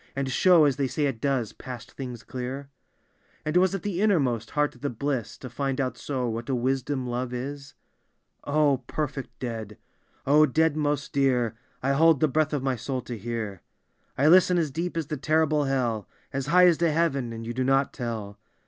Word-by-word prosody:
And 135 -1 -2
show, 175 +1 +5
as 140 -3 +2
they 140 -2 +1
say 145 +3 -1
it 130 -5 -2
does, 135 -6 0
past 125 -3 -9
things 125 -3 -7
clear? 130 +2 -6 0.4
" - - -37
And 155 +2 -2
was 185 +1 +3
it 195 - -5
the 195 -2 -2
innermost 135 - +2
heart 150 -1 0
of - - -19
the 145 - -1
bliss 130 -1 -3
To 130 - -8
find 135 +2 -2
out 130 -2 -1
so, 130 -4 -3
what 115 +2 -4
a 130 - +1
wisdom 130 +2 -1
love 125 0 -3
is? 140 +2 -6 0.3
" - - -48
O 145 -3 +4
perfect 145 -3 -3
dead 110 -4 -5 0.5
I 135 - 0
O 155 +1 +7
dead 160 +3 +2
most 145 -1 -1
dear 125 -5 +2 0.3
I 135 - +2
I - - +3
hold 160 0 +5
the 155 - +4
breath 155 +2 +1
of 145 -3 -2
my 135 -1 +1
soul 125 +3 -3
to 120 - -6
hear. 110 -3 -5 0.3
" - - -43
1 145 +4 +4
listen 180 0 +6
as 160 -4 0
deep 165 +4 -3
as 165 - -1
to 150 +2 -4
terrible 155 +1 +2
hell, 120 -6 -1 0.2
As 135 0 -2
high 180 +4 +6
as 175 -3 +4
to 170 -2 +3
heaven, 145 -7 0
and 115 0 -6
you 120 - -4
do 130 +2 -1
not 135 +1 +2
tell. 110 -5 -5
135 Hz, 215 wpm, -26 LUFS, 125-150 Hz, 0.5 s, O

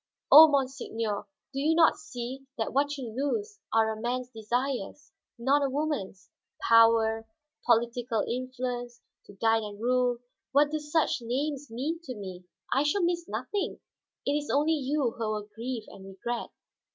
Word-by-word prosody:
Oh, 315 +2 +12
monseigneur, 245 -7 -1 0.3
do 275 - -2
you 310 +3 +2
not 325 -1 +6
see 265 -2 -7
that 225 - -2
what 285 +2 +1
you 255 -4 -5
lose 410 - -2
are 220 0 +3
a 215 - -8
man's 250 +1 -2
desires, 250 +4 -3 0.3
not 275 +5 +2
a 275 - +1
woman's? 275 -10 -3 0.4
Power, 225 -1 +5 0.4
political 235 -1 +2
influence, 245 -1 -4 0.3
to - - -12
guide 225 +2 +2
and 205 -1 -7
rule 245 +1 +2 0.4
what 290 +1 +4
do 310 - -1
such 300 -3 0
names 280 +4 -2
mean 280 +9 -3
to 255 - -5
me? 185 -3 -8 0.3
I 270 - +3
shall 295 +6 +1
miss 345 0 0
nothing; 405 -1 -3 0.5
it 280 - +1
is 295 0 -2
only 300 +3 +3
you 280 -3 0
who 225 -2 -3
will 210 -1 -4
grieve 230 +1 -4
and 190 - -12
regret." 195 +5 -5
250 Hz, 155 wpm, -28 LUFS, 225-290 Hz, 0.5 s, Oh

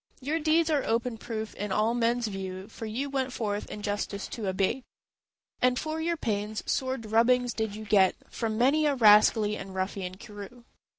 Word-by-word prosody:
Your 295 +5 -1
deeds 320 +1 +2
are 290 -3 +2
open 230 0 -1
proof 220 -2 -5
in 205 0 -5
all 215 +4 +2
men's 240 0 +1
view; 190 -2 -5
For 225 - -8
you 245 +6 -2
went 270 -2 -2
forth 210 -4 -3
injustice 205 -1 -3
to 220 -4 -5
abate, 195 +7 0 0.8
And 250 0 +3
for 315 +3 -3
your 335 +1 0
pains 210 -3 -2
sore 260 0 -1
drubbings 235 +2 +2
did 220 -2 -2
you 215 0 -7
get 195 -3 +4
From 220 -2 -3
many 285 +6 +3
a 285 - +2
rascally 210 -2 +5
and 195 -2 -8
ruffian 185 -1 -3
crew. 215 +2 -11
225 Hz, 175 wpm, -28 LUFS, 205-255 Hz, 0.8 s, rascally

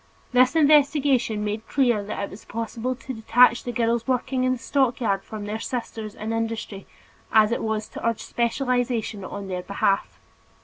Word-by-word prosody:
This 255 +4 +4
investigation 285 -7 +3
made 210 +1 -4
clear 245 -6 +2
that 205 0 -4
it 200 - -4
was 195 - -10
as - - -18
impossible 230 +3 -3
to 260 +1 -7
detach 240 +2 +4
the 245 - -3
girls 235 0 0
working 255 0 0
in 255 0 +2
the - - -3
stockyards 235 -6 0
from 215 -2 -7
their 215 +2 -4
sisters 225 -3 -5
in 220 +1 -4
industry 225 -3 -4 0.4
as 215 0 +5
it 235 - -1
was 220 -1 -2
to - - -9
urge 230 -1 -1
special 240 +3 -1
legislation 245 -5 -1
on 195 +1 -6
their 180 -1 -3
behalf. 195 +1 -1
230 Hz, 180 wpm, -24 LUFS, 215-255 Hz, 0.4 s, as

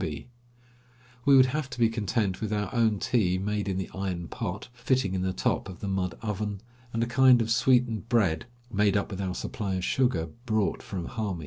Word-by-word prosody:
We 125 - -5 1.0
would 130 -1 +8
have 135 +1 -2
to 125 - -8
be 115 - +5
content 110 -3 -1
with 110 -1 -2
our 105 -2 -2
own 115 -3 +3
tea 95 -4 +1
made 105 +1 -2
in 95 - -1
the 95 -3 -4
iron 90 -3 -3
pot, 100 -3 -4
fitting 125 -4 0
in 95 - -1
the 95 0 0
top 95 - -1
of 90 - -9
the 100 - -5
mud 95 -2 -1
oven, 105 -2 -3 0.3
and 115 0 0
a - - +1
kind 125 +1 +5
of 115 -1 0
sweetened 120 -2 +2
bread 105 -6 +2 0.3
made 105 0 +3
up 100 - -2
with 100 0 -4
our 95 -1 -2
supply 100 -3 -3
of 90 - -2
sugar 90 -9 +1 0.2
brought 110 -3 +1
from 90 -4 -5
Hami. 105 -6 -3
105 Hz, 205 wpm, -28 LUFS, 95-120 Hz, 1.0 s, would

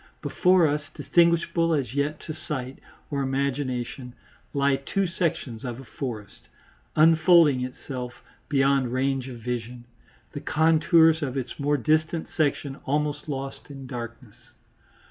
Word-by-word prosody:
Before 180 -2 +4
us, 150 0 +1
distinguishable 170 -1 +2
as 130 -5 -2
yet 145 +2 -1
to 155 - -6
sight 140 -4 -5 0.3
or 140 -1 -1
imagination, 130 -2 -2 0.4
lie 140 -1 +2
two 195 +8 -1
sections 165 -9 -2
of 120 -1 -5
a - - -9
forest, 120 -6 -7 0.5
unfolding 160 -3 +5
itself 125 -1 -7 0.3
beyond 135 -3 +2
range 135 0 0
of 125 -2 -7
vision, 120 0 -5 0.5
the - - -6
contours 160 0 +4
of 140 -2 -2
its 130 +1 -5
more 145 +1 +1
distant 155 +5 0
section 140 -2 0
almost 150 +1 -1
lost 135 0 -5
in 135 -2 -9
darkness. 120 -3 -8
140 Hz, 125 wpm, -25 LUFS, 125-155 Hz, 0.5 s, unfolding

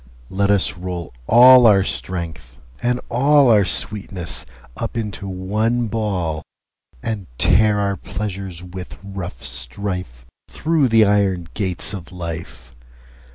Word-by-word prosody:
Let 100 +1 0
us 100 -4 +2
roll 90 -4 -6
all 125 +1 +8
our 100 -3 +5
Strength, 80 -10 -5 0.2
and 125 +1 0
allOur 125 -6 +4
sweetness, 95 - -1 0.3
up - - -5
into 105 -3 -4
one 105 +6 -1
Ball:And 95 - -5
tear 105 +2 +4
our 100 -1 0
Pleasures 95 -4 -6
with 90 0 -9
rough 95 -9 -7
strife, 65 -2 -3 0.2
Thorough 155 -4 +1
the 115 -2 +5
Iron 95 -4 +1
gates 95 -2 -1
of 90 -3 -8
Life. 80 -8 -7
95 Hz, 110 wpm, -20 LUFS, 85-110 Hz, 0.3 s, all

